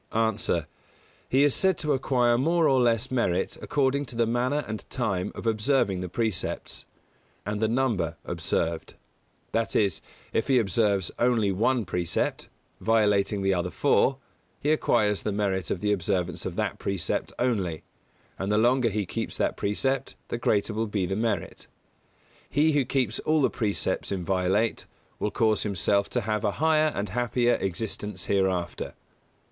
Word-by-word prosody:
_ 110 Hz, -1 st, 0 dB
A. -, -, +1 dB, 0.6 s
He 135 Hz, +2 st, +4 dB
is 145 Hz, -2 st, +4 dB
said 190 Hz, -2 st, +2 dB
to 150 Hz, -2 st, 0 dB
acquire 125 Hz, -3 st, +2 dB
more 165 Hz, +6 st, +3 dB
or 130 Hz, -2 st, +4 dB
less 120 Hz, +1 st, +1 dB
merit 120 Hz, -9 st, 0 dB
according 140 Hz, 0 st, +1 dB
to 125 Hz, -, -9 dB
the 115 Hz, 0 st, +2 dB
manner 125 Hz, +6 st, 0 dB
and 110 Hz, -1 st, -5 dB
time 100 Hz, -6 st, -1 dB
of -, -, -7 dB
observing 110 Hz, -3 st, +1 dB
the 90 Hz, -, -4 dB
precepts, 110 Hz, 0 st, -3 dB, 0.6 s
and 105 Hz, +1 st, -2 dB
the 110 Hz, -, +3 dB
number 110 Hz, -, 0 dB
observed; 80 Hz, 0 st, -2 dB, 0.6 s
that 115 Hz, -3 st, -1 dB
is, 100 Hz, -6 st, +2 dB, 0.3 s
if 115 Hz, -, 0 dB
he 135 Hz, -, +4 dB
observes 100 Hz, -4 st, +2 dB
only 115 Hz, -4 st, +3 dB
one 115 Hz, +4 st, +1 dB
precept, 90 Hz, -1 st, -1 dB, 0.3 s
violating 105 Hz, -3 st, +2 dB
the 95 Hz, 0 st, +3 dB
other 90 Hz, -1 st, -1 dB
four, 135 Hz, +3 st, +2 dB, 0.4 s
he 150 Hz, -, +1 dB
acquires 105 Hz, -9 st, +2 dB
the 105 Hz, -, -2 dB
merit 95 Hz, -4 st, -1 dB
of 90 Hz, -, -2 dB
the 105 Hz, -, +1 dB
observance 90 Hz, -2 st, -1 dB
of -, -, -6 dB
that -, -, -2 dB
precept 95 Hz, -6 st, -2 dB
only; 100 Hz, -10 st, -1 dB, 0.6 s
and 95 Hz, +2 st, -1 dB
the 105 Hz, -, +3 dB
longer 120 Hz, +2 st, +3 dB
he 105 Hz, -1 st, -2 dB
keeps -, -, -4 dB
that -, -, 0 dB
precept 130 Hz, +6 st, -1 dB
the -, -, -2 dB
greater 110 Hz, -1 st, +1 dB
will 110 Hz, +1 st, -1 dB
be 105 Hz, -3 st, -1 dB
the 95 Hz, -, -2 dB
merit. 110 Hz, -4 st, -2 dB, 0.8 s
He 155 Hz, +2 st, +3 dB
who 145 Hz, -3 st, +2 dB
keeps 125 Hz, -5 st, 0 dB
all 155 Hz, -1 st, +2 dB
the -, -, +3 dB
precepts 105 Hz, -3 st, -1 dB
inviolate 95 Hz, +3 st, 0 dB, 0.3 s
will 105 Hz, -, 0 dB
cause 110 Hz, -1 st, +2 dB
himself 100 Hz, 0 st, +1 dB
to -, -, -1 dB
have 110 Hz, +1 st, -2 dB
a 105 Hz, -2 st, +1 dB
higher 155 Hz, 0 st, +3 dB
and 100 Hz, 0 st, -2 dB
happier 120 Hz, +2 st, +1 dB
existence 95 Hz, 0 st, -3 dB
hereafter. 95 Hz, -3 st, -1 dB
110 Hz, 160 wpm, -26 LUFS, 95-125 Hz, 0.8 s, He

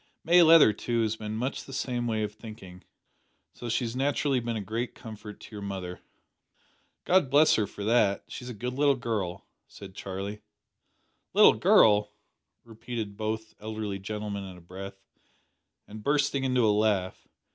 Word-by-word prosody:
May 175 Hz, +2 st, +6 dB
Leather, 160 Hz, -9 st, +7 dB
too, 115 Hz, +2 st, -1 dB
has 110 Hz, 0 st, 0 dB
been 110 Hz, -1 st, -5 dB
much 125 Hz, +4 st, -3 dB
the -, -, -11 dB
same 125 Hz, -2 st, -2 dB
way 110 Hz, -2 st, 0 dB
of 105 Hz, 0 st, -4 dB
thinking, 105 Hz, -5 st, -11 dB, 0.7 s
so 120 Hz, -, -7 dB
she 115 Hz, -, 0 dB
has 115 Hz, +1 st, -5 dB
naturally 135 Hz, 0 st, +1 dB
been 120 Hz, -1 st, -3 dB
a -, -, -2 dB
great 115 Hz, +5 st, -4 dB
comfort 110 Hz, -2 st, -10 dB
to -, -, -13 dB
your 105 Hz, -, -6 dB
mother." 95 Hz, -3 st, -5 dB, 1.1 s
"God 180 Hz, -7 st, +3 dB
bless 145 Hz, +3 st, +5 dB
her 105 Hz, -2 st, +1 dB
for 100 Hz, -, -8 dB
that. 105 Hz, -3 st, +2 dB
She's 125 Hz, -, -8 dB
a 120 Hz, -, -6 dB
good 125 Hz, +4 st, -4 dB
little 140 Hz, +1 st, +3 dB
girl," 110 Hz, -8 st, -3 dB, 0.2 s
said 95 Hz, -2 st, -12 dB
Charlie. 100 Hz, +2 st, -6 dB, 0.9 s
"Little -, -, +8 dB
girl," 105 Hz, -1 st, +4 dB, 0.5 s
repeated 115 Hz, -2 st, -6 dB
both 110 Hz, +1 st, -4 dB
elderly 110 Hz, -2 st, -4 dB
gentlemen 105 Hz, 0 st, -5 dB
in 95 Hz, -2 st, -9 dB
a -, -, -15 dB
breath, 95 Hz, +3 st, -10 dB, 0.8 s
and 105 Hz, +1 st, -9 dB
bursting 140 Hz, -1 st, +1 dB
into 125 Hz, -2 st, +2 dB
a 105 Hz, -, +4 dB
laugh. 105 Hz, -3 st, 0 dB
110 Hz, 165 wpm, -28 LUFS, 100-125 Hz, 1.1 s, Little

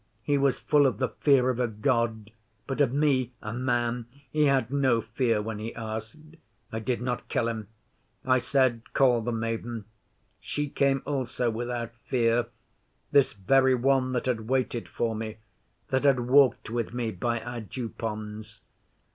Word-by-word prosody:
He 145 Hz, -, +1 dB
was 135 Hz, -2 st, +2 dB
full 145 Hz, -2 st, +4 dB
of 120 Hz, -6 st, -1 dB
the -, -, 0 dB
fear 130 Hz, -3 st, +4 dB
of 125 Hz, -, -4 dB
a 125 Hz, -, +2 dB
God, 110 Hz, -1 st, -1 dB, 0.3 s
but 135 Hz, +1 st, -2 dB
of 135 Hz, -4 st, +3 dB
me, 135 Hz, -3 st, +1 dB
a 110 Hz, -, -6 dB
man, 120 Hz, -1 st, -1 dB, 0.2 s
he 150 Hz, -1 st, +3 dB
had 135 Hz, -4 st, +2 dB
no 135 Hz, -4 st, +3 dB
fear 115 Hz, -1 st, 0 dB
when 110 Hz, -1 st, -4 dB
he 110 Hz, +2 st, -5 dB
asked. 115 Hz, +9 st, -7 dB, 0.3 s
I 110 Hz, -, -3 dB
did 120 Hz, +2 st, -2 dB
not 125 Hz, -1 st, -3 dB
kill 115 Hz, -, 0 dB
him. 110 Hz, -3 st, -4 dB, 0.6 s
I 130 Hz, 0 st, +4 dB
said, 130 Hz, -2 st, +2 dB
"Call 125 Hz, -4 st, +4 dB
the 120 Hz, +2 st, -2 dB
maiden." 115 Hz, -1 st, -3 dB, 0.5 s
She 150 Hz, -1 st, -3 dB
came 135 Hz, -1 st, +1 dB
also 125 Hz, -4 st, -1 dB
without 120 Hz, 0 st, -4 dB
fear 120 Hz, -2 st, +2 dB, 0.6 s
this 140 Hz, -2 st, +4 dB
very 130 Hz, +6 st, +3 dB
one 130 Hz, +1 st, +2 dB
that 125 Hz, -, -1 dB
had 115 Hz, -3 st, -2 dB
waited 130 Hz, -3 st, 0 dB
for 115 Hz, -1 st, -1 dB
me, 110 Hz, 0 st, -5 dB, 0.5 s
that 130 Hz, +1 st, +1 dB
had 140 Hz, -2 st, +6 dB
talked 125 Hz, -1 st, +3 dB
with 120 Hz, 0 st, -2 dB
me, 120 Hz, -2 st, -1 dB
by 115 Hz, +5 st, -1 dB
our 120 Hz, +1 st, -6 dB
Dew 115 Hz, +2 st, -5 dB
ponds. 105 Hz, -1 st, -6 dB
120 Hz, 165 wpm, -27 LUFS, 115-130 Hz, 0.6 s, had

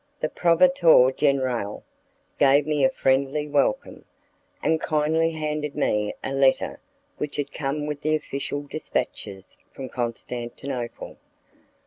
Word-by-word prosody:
The 155 Hz, -, -1 dB
'proveditore 170 Hz, -6 st, +5 dB
generale' 130 Hz, -7 st, 0 dB, 0.6 s
gave 140 Hz, +1 st, +5 dB
me 150 Hz, -2 st, 0 dB
a 130 Hz, -, +6 dB
friendly 135 Hz, +3 st, +1 dB
welcome, 145 Hz, -6 st, 0 dB, 0.6 s
and 160 Hz, -1 st, +2 dB
kindly 160 Hz, +1 st, +1 dB
handed 150 Hz, -2 st, -3 dB
me 105 Hz, 0 st, 0 dB
a 135 Hz, -, -3 dB
letter 135 Hz, -1 st, +2 dB, 0.4 s
which 150 Hz, -1 st, -4 dB
had 145 Hz, -1 st, -3 dB
come 145 Hz, +1 st, -3 dB
with 150 Hz, -1 st, -4 dB
the 155 Hz, 0 st, +1 dB
official 145 Hz, -1 st, -4 dB
dispatches 100 Hz, -9 st, -5 dB
from 130 Hz, -1 st, -8 dB
Constantinople. 120 Hz, +1 st, -5 dB
140 Hz, 115 wpm, -24 LUFS, 130-150 Hz, 0.6 s, a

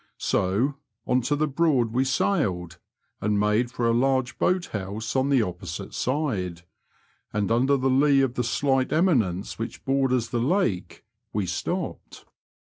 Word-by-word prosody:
So 105 Hz, +10 st, +1 dB, 0.3 s
on 125 Hz, 0 st, +2 dB
to 140 Hz, +5 st, 0 dB
the 155 Hz, +1 st, +1 dB
Broad 135 Hz, -6 st, +2 dB
we 130 Hz, +2 st, +2 dB
sailed, 105 Hz, -, 0 dB, 0.4 s
and 105 Hz, -1 st, +1 dB
made 105 Hz, +4 st, +2 dB
for 120 Hz, -1 st, -1 dB
a 115 Hz, -, +3 dB
large 130 Hz, +1 st, +1 dB
boat 180 Hz, -1 st, +2 dB
house 105 Hz, +4 st, -4 dB
on 130 Hz, +1 st, +2 dB
the 135 Hz, -5 st, +4 dB
opposite 90 Hz, -4 st, -6 dB
side, 105 Hz, -, -2 dB, 0.7 s
and 105 Hz, +1 st, -1 dB
under 130 Hz, +4 st, +3 dB
the 130 Hz, 0 st, 0 dB
lee 135 Hz, +1 st, +4 dB
of 135 Hz, -3 st, +1 dB
the 125 Hz, -, -1 dB
slight 135 Hz, +2 st, +1 dB
eminence 115 Hz, -, +1 dB
which 115 Hz, -, -6 dB
borders 130 Hz, -3 st, +1 dB
the 120 Hz, -, -1 dB
lake 120 Hz, -, -1 dB, 0.3 s
we 105 Hz, -2 st, 0 dB
stopped. 90 Hz, -1 st, -4 dB
125 Hz, 150 wpm, -25 LUFS, 105-135 Hz, 0.7 s, the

